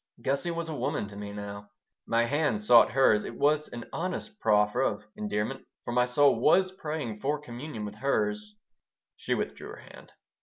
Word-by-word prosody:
Gussie 140 +6 0
was 170 -1 -3
a 160 - -4
woman 130 -5 -2
to 100 - -11
me 100 0 -6
now. 100 0 -7 0.4
My 115 0 +3
hand 145 -5 0
sought 115 +1 +6
hers. 120 -5 +4
It - - -7
was 150 +1 +2
an 120 -1 -8
honest 205 +5 -4
proffer 105 -1 +3
of 105 - -1
endearment, 105 +5 -3 0.2
for - - -3
my 125 +1 +3
soul 135 -1 +4
was 185 +8 +4
praying 150 - -5
for 145 +5 -1
communion 125 -4 -7
with 105 - -6
hers 210 - -1 0.6
She - - -1
withdrew - - -4
her - - -8 0.2
hand. - - -15
130 Hz, 180 wpm, -29 LUFS, 105-155 Hz, 0.6 s, sought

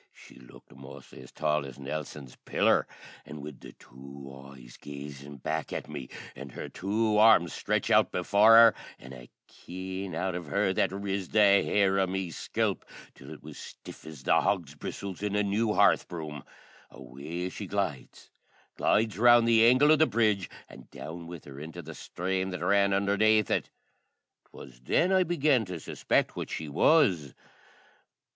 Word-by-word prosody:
she - - -17
looked 65 0 -17
mostly 65 -1 -13
as 65 - -14
tall 75 -1 -1
as 65 -3 -10
Nelson's 70 -1 -7
Pillar; - - +1 0.4
an' 75 - -10
wid 70 -2 -10
the - - -12
two 70 +2 -13 0.2
eyes 60 -3 -14
gazin' 70 0 -10
back 80 +4 -4
at - - -5
me, 65 - -8 0.3
an' 70 +1 -9
her - - -8
two 105 +2 0
arms 105 -7 +5
stretched - - -2
out - - +4
before 105 +5 +4
hor, 115 -1 +8 0.2
an' 65 +1 -12
a - - -13 0.2
keine 95 0 -7
out 95 +2 -2
of 90 -2 -6
her 100 +4 0
that - - +1
riz 100 -1 -4
the 110 - +1 0.2
hair 95 -1 +1
o' 95 - +2
me 95 -1 -3
scalp - - -2 0.3
till 65 - -14
it 80 - -12
was 75 -1 -11
as - - -9
stiff - - -12
as 75 -4 -11
the - - +3
hog's 85 -8 -1
bristles 95 +5 -7
in 105 -1 -2
a 105 - +2
new 105 +2 0
hearth - - +3
broom, 75 -4 -7 0.5
away 80 +8 -7
she 100 +1 -8
glides 90 -10 -4 0.5
glides 110 -2 +1
round 120 0 +6
the 115 -1 +5
angle 130 +6 +5
o' - - +7
the 155 +1 +3
brudge, 105 -5 0 0.2
an' - - -14
down 85 +1 -9
with 85 -2 -10
her 70 -1 -11
into 80 +1 -9
the - - -9
sthrame 95 +1 -3
that 90 -2 -5
ran 100 +1 +3
undhernaith 100 +1 +2
it. - - -1 0.8
'Twas 65 -3 -13
then 170 - +1
I 190 -1 +4
began 155 -8 +2
to 90 -3 -7
suspect - - -1
what - - -5
she 80 - -5
was. 85 - +2
90 Hz, 175 wpm, -28 LUFS, 70-105 Hz, 0.8 s, hor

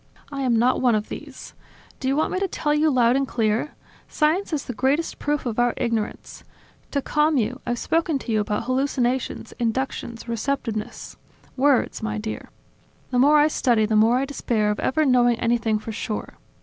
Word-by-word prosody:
I 275 -1 -4
am 245 -3 +2
not 245 +3 +2
one 245 -3 +4
of 210 0 -2
these. - - -9 0.5
Do 260 - -3
you 270 - +2
want 310 - +1
me 370 - -1
to 390 - 0
tell 295 -4 -1
you 305 +1 +3
loud 245 -3 +3
and 275 0 +1
clear? 225 +4 -1 0.3
Science 320 +6 +1
is 295 -3 -2
the 250 - -5
greatest 270 +8 0
proof 295 -1 -1
of 235 -1 -2
our 240 0 +2
ignorance. 230 -2 -3 0.5
To 280 -2 -2
calm 300 0 +2
you, 245 +3 -1
I've 240 0 0
spoken 325 +2 0
to 255 - -6
you 215 - +2
about 210 +1 -1
hallucinations, 255 0 -1
inductions, 235 0 -3
receptiveness... 230 -2 -3 0.4
Words, 275 -2 +2
my 215 -1 -2
dear! 215 +1 -5 0.6
The 250 - +2
more 290 +4 +6
I 295 +1 +5
study, 240 -7 +2
the 215 0 0
more 225 +3 +5
I 270 - 0
despair 225 -6 0
of 210 - -3
ever 310 +4 +1
knowing 245 -3 +3
anything 230 -2 +1
for 215 +1 -6
sure. 215 -1 -4
250 Hz, 190 wpm, -23 LUFS, 225-285 Hz, 0.6 s, more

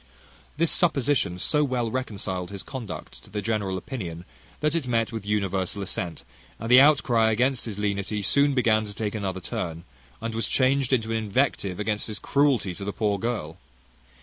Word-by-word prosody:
This 165 +1 +3
supposition 140 - +2
so 150 - +2
well 125 -5 -1
reconciled 100 -8 -3
his 100 -1 -6
conduct 115 - -7
to - - -15
the 105 - -3
general 105 -3 -1
opinion, 90 -7 -6 0.3
that 150 0 +1
it 165 -6 -1
met 115 -2 +1
with 110 -3 -6
universal 100 -1 -1
assent; 90 -2 -4 0.4
and 115 +2 -3
the 125 +1 +10
outcry 130 -6 +4
against 125 +3 +1
his 105 -4 -5
lenity 100 0 -1
soon 140 +7 +3
began 110 -4 +3
to 100 -1 -8
take 105 -2 -2
another 95 -3 -3
turn, 85 -1 -4 0.4
and 115 0 -4
was 115 +1 -1
changed 135 0 +2
into 115 -4 +1
an 115 - +1
invective 105 -3 0
against 105 0 -1
his 105 -2 -4
cruelty 135 -9 +2
to 100 - -7
the 100 - -2
poor 105 -1 0
girl. 105 -9 -3
110 Hz, 175 wpm, -26 LUFS, 100-130 Hz, 0.4 s, the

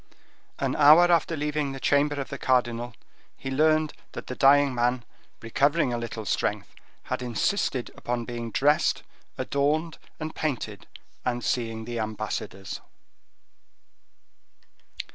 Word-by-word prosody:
An - - -1
hour 155 +4 +7
after 165 -1 +2
leaving 150 -1 -1
the 135 - -7
chamber 145 +1 +2
of 135 - -4
the 140 - -6
cardinal, 120 -2 0 0.4
he 135 - -6
learned 155 +2 +3 0.2
that - - -7
the 125 - -6
dying 140 0 +5
man, 120 0 0 0.4
recovering 140 +4 +2
a - - 0
little 115 -2 -5
strength, - - -1 0.3
had - - -3
insisted 125 - -1
upon 120 -1 -3
being 120 -1 -5
dressed, 145 +7 +2 0.3
adorned 155 +4 0 0.2
and 155 0 -4
painted, 120 -9 -3 0.4
and 120 -1 -1
seeing 115 -2 -2
the 120 0 -4
ambassadors. 110 -3 -4
130 Hz, 125 wpm, -26 LUFS, 120-150 Hz, 0.4 s, hour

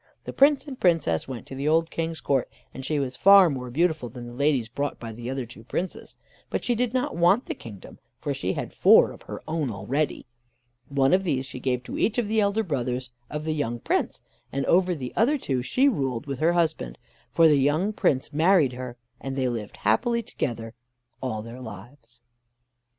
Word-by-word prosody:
The - - -7
Prince 285 +1 +4
and 275 -4 -8
Princess 165 - +2
went 130 -4 -7
to - - -10
the 135 +2 -3
old 165 +1 +2
King's 165 -1 -3
court, 135 -3 0 0.2
and 130 - -7
she 150 +3 -1
was 130 -2 -2
far 195 -1 +7
more 125 -2 -5
beautiful 155 -2 0
than 120 +1 -9
the 120 - -9
ladies 135 -3 +1
brought 140 +5 -3
by 115 -1 -6
the 120 +2 -6
other 130 -1 -3
two 115 -1 -13
Princes. 175 +10 -4 0.3
But - - -2
she 245 - +1
did 240 0 0
not 255 -7 -1
want 175 +8 +4
the - - -3
kingdom, 105 -5 -11 0.2
for - - -3
she - - -2
had - - -5
four - - +6
of - - -13
her - - -8
own 155 -4 -1
already. 120 +9 -2 0.6
One 135 0 +3
of 190 +1 +4
these 135 -7 -1
she 130 - -8
gave 125 -1 -1
to - - -6
each 225 - +1
of 240 -3 +1
the 220 +1 +2
elder 205 +2 +1
brothers 125 - -2 0.2
of 150 +1 -5
the 160 - 0
young 120 -6 -2
Prince, - - -1 0.3
and 140 0 -1
over 180 0 +3
the 130 -5 -6
other 270 +7 +3
two 130 - -2
she 255 - +2
ruled 135 - -1
with 140 -3 -5
her 165 +2 +3
husband, 160 - 0 0.3
for 165 -1 +5
the 150 -2 +5
young 155 +10 +1
Prince 140 -7 0
married 160 -3 +4
her, 125 -1 -7 0.2
and 135 0 -5
they 130 -1 0
lived 115 -4 -5
happily 235 - +1
together 115 - -4 0.5
all 110 -5 -3
their 115 +3 -9
lives. 120 +2 -11
140 Hz, 205 wpm, -25 LUFS, 125-170 Hz, 0.6 s, far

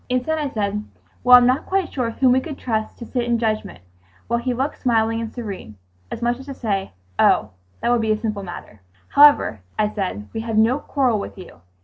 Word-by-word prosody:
Instead, 255 +6 0
I 295 -2 -1
said, 210 -3 -2 0.4
"Well, 250 0 +9
I'm 245 - +5
not 255 +4 +1
quite 380 -2 -1
sure 250 -4 -1
whom 255 +2 +2
we 255 - +4
could 285 +1 -7
trust 220 -3 -3
to 235 - -8
sit 245 +1 -2
in 240 0 +1
judgment"—while 95 - -4
he 250 +1 -2
looked 265 +4 -2
smiling 225 -2 +1
and 225 -1 -5
serene, 200 - -7 0.3
as 235 - -6
much 240 +1 0
as 265 - -11
to 275 - -6
say, 200 -5 -2 0.3
"Oh, 105 - +4 0.3
that - - 0
would 240 -1 +3
be 220 -1 +1
a 215 - +2
simple 215 -2 -3
matter." 175 - -9 0.3
"However," 290 - +5 0.2
I 210 - +2
said, 180 - -3
"we 225 - -3
have 225 -1 -3
no 230 +6 +4
quarrel 255 -8 0
with 200 - -7
you. 180 - -12
230 Hz, 215 wpm, -21 LUFS, 205-255 Hz, 0.4 s, Well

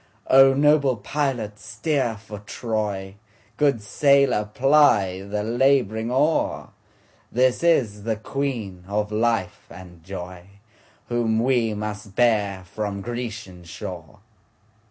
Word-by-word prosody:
O 135 0 +7
noble 140 -3 +3
pilot 115 -4 -3
steer 115 +2 -2
for 105 -1 -10
Troy, 105 -3 -4 0.4
Good 140 -5 +1
sailor 140 -1 +3
ply 115 -9 +3
the 105 +1 -4
labouring 120 -1 +1
oar, 145 +6 0 0.6
This 125 +1 +2
is 120 -12 +2
the 110 +1 -1
Queen 110 -6 -4
of 105 +1 -2
life 110 -4 -1
and 90 -2 -13
joyWhom 100 +5 -5
we 120 -3 +1
must 105 -1 -6
bear 105 -6 +1
from 100 +1 -4
Grecian 105 -6 -6
shore! 85 - -9
110 Hz, 105 wpm, -23 LUFS, 100-130 Hz, 0.6 s, O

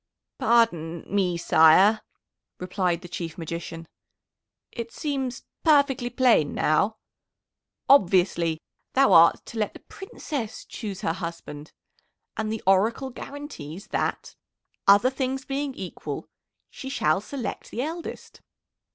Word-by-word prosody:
"Pardon 175 -9 +2
me, 185 -3 0
sire," 170 +7 +5 0.6
replied 180 -2 -1
the 180 - -9
Chief 170 -2 -6
Magician; 165 0 -6 0.8
"it 235 -1 -6
seems 270 -5 -3 0.2
perfectly 280 -5 +3
plain 245 - +3
now. 200 +8 +1 0.9
Obviously, 175 - +3 0.4
thou 270 +1 +5
art 165 0 +6
to 230 - -7
let 210 - -1
the - - -11
Princess 290 - -6
choose 200 -5 -7
her 165 - 0
husband, 165 -4 -7 0.6
and 215 -1 -2
the 220 - -4
Oracle 220 +8 +2
guarantees 215 - -9
that, - - -2 0.5
other 205 +6 +6
things 265 0 -3
being 275 -1 -3
equal, 185 -2 -6 0.4
she 265 - -8
shall 155 - +1
select 255 +3 -6
the 240 - -3
eldest. 330 +3 -7
210 Hz, 115 wpm, -25 LUFS, 170-260 Hz, 0.9 s, art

